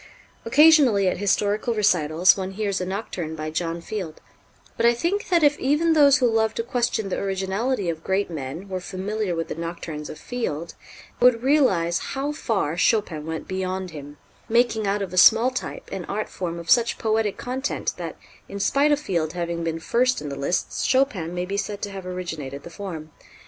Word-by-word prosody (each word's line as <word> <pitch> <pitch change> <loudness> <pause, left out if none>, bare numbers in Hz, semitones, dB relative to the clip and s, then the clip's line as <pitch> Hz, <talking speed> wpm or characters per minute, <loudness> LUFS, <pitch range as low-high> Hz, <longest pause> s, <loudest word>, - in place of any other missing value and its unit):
Occasionally 265 -6 +6
at 180 - 0
historical 205 +3 +1
recitals 180 -4 +4
one 190 0 -4
hears 200 -2 -2
a 180 - -3
nocturne 185 -5 -4
by 155 0 -5
John 165 +1 -2
Field; 180 -4 -6 0.6
but - - -2
I 235 0 +5
think 345 +11 -1
that 345 -3 +3
if 290 0 +4
even 300 +5 +2
those 285 -3 +6
who 255 - +2
love 225 -2 +2
to 230 - -1
question 235 -4 -1
the - - -2
originality 195 +3 -1
of 165 -1 -3
great 190 +1 0
men 160 +3 -6
were 185 -1 -3
familiar 190 +1 -3
with 165 -1 -3
the - - -4
nocturnes 165 -2 -6
of - - -8
Field, 170 -10 -4 0.5
they 240 - +3
would 235 -1 +2
realize 195 - +3
how 280 +2 -3
far 200 - -1
Chopin 175 -8 +1
went 160 0 -5
beyond 185 -1 -3
him, 145 -1 -10 0.3
making 225 -2 +2
out 200 +1 0
of 185 -2 -6
a - - -4
small 225 +6 +7
type - - -5
an - - -5
art - - -3
form 170 -2 -4
of 170 0 -4
such 235 -1 +4
poetic 220 -2 0
content 260 +3 -3
that, - - -5 0.3
in 200 - -6
spite 280 +8 +3
of 290 - +3
Field 170 - -2
having 170 -1 -3
been 165 0 -2
first 250 +9 +1
in 150 - -6
the 140 - -5
lists, 140 +6 -1
Chopin 255 - +1
may 180 0 -2
be 200 +2 -3
said 205 0 -3
to 205 - -3
have 190 -2 -7
originated 160 -7 -5
the 170 - -10
form. 165 -5 -7
195 Hz, 195 wpm, -24 LUFS, 170-235 Hz, 0.6 s, small